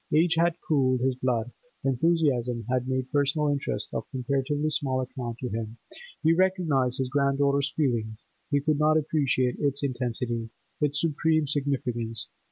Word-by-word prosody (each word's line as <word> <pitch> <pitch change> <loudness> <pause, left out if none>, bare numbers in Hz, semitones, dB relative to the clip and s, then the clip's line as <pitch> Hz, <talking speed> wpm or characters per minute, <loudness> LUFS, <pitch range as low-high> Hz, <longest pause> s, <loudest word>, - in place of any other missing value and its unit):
Age 165 +2 +4
had 170 0 +2
cooled 130 -4 +2
his 130 +1 +2
blood; 125 -2 -1 0.3
enthusiasm 130 -4 +1
had 130 0 0
made 130 0 -2
personal 145 +1 +2
interests 140 -1 -2
of - - -4
comparatively 140 +3 -1
small 135 -3 0
account 125 -2 -4
to 125 - -2
him; 110 +1 -4 0.5
he 160 +1 +5
recognised 165 -9 +2
his 130 - 0
granddaughter's 140 0 +2
feeling, 115 -7 0 0.4
but 140 0 +1
could 155 -2 +2
not 155 +1 +4
appreciate 140 -5 +1
its 140 -1 0
intensity, 120 -3 -2 0.3
its 145 0 +1
supreme 155 0 +2
significance. 125 -6 -2
135 Hz, 145 wpm, -27 LUFS, 125-150 Hz, 0.5 s, he